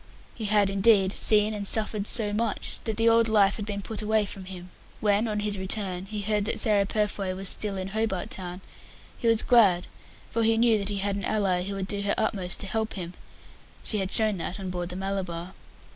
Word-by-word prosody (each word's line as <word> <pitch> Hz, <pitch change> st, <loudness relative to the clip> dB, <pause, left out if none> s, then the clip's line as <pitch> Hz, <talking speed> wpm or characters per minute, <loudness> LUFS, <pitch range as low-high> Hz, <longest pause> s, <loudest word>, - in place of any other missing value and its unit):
He 220 Hz, -, -6 dB
had, 205 Hz, -1 st, +3 dB
indeed, 195 Hz, -1 st, +3 dB
seen 215 Hz, 0 st, +4 dB
and 205 Hz, -1 st, -2 dB
suffered 215 Hz, -1 st, +1 dB
so 215 Hz, -3 st, 0 dB
much 220 Hz, -1 st, -1 dB
that 220 Hz, -2 st, -3 dB
the 230 Hz, 0 st, +2 dB
old 230 Hz, 0 st, +4 dB
life 205 Hz, -2 st, +3 dB
had 210 Hz, -1 st, -6 dB
been 200 Hz, -1 st, -4 dB
put 220 Hz, +1 st, -3 dB
away 215 Hz, 0 st, +1 dB
from 195 Hz, -1 st, -8 dB
him. 180 Hz, -1 st, -9 dB, 0.3 s
When, 210 Hz, +2 st, +1 dB
on 210 Hz, -1 st, -2 dB
his 205 Hz, -2 st, -1 dB
return, 190 Hz, -1 st, -2 dB
he 210 Hz, 0 st, -4 dB
heard 210 Hz, 0 st, 0 dB
that 225 Hz, -, -1 dB
Sarah 205 Hz, -3 st, +2 dB
Purfoy 200 Hz, -3 st, -1 dB
was 195 Hz, +1 st, -2 dB
still 205 Hz, -2 st, 0 dB
in 190 Hz, 0 st, -4 dB
Hobart 215 Hz, -3 st, -2 dB
Town, 180 Hz, 0 st, -5 dB, 0.5 s
he 235 Hz, -, -3 dB
was 225 Hz, -1 st, +5 dB
glad, 200 Hz, -8 st, +4 dB, 0.5 s
for 230 Hz, -, -1 dB
he 225 Hz, 0 st, +3 dB
knew 225 Hz, -2 st, +3 dB
that 200 Hz, 0 st, -2 dB
he 205 Hz, -, -2 dB
had 200 Hz, 0 st, 0 dB
an 200 Hz, -, -5 dB
ally 195 Hz, -4 st, 0 dB
who 195 Hz, +2 st, -4 dB
would 190 Hz, -1 st, -4 dB
do 200 Hz, -1 st, -1 dB
her 200 Hz, 0 st, 0 dB
utmost 195 Hz, -5 st, -1 dB
to -, -, -4 dB
help 220 Hz, +2 st, -2 dB
him 180 Hz, -2 st, -6 dB, 0.7 s
she 215 Hz, -, -1 dB
had 190 Hz, -1 st, -2 dB
shown 215 Hz, -1 st, +3 dB
that 180 Hz, +3 st, -4 dB
on 190 Hz, -2 st, -5 dB
board 175 Hz, -1 st, -4 dB
the 180 Hz, -, -7 dB
Malabar. 185 Hz, -2 st, -4 dB
205 Hz, 220 wpm, -26 LUFS, 190-215 Hz, 0.7 s, was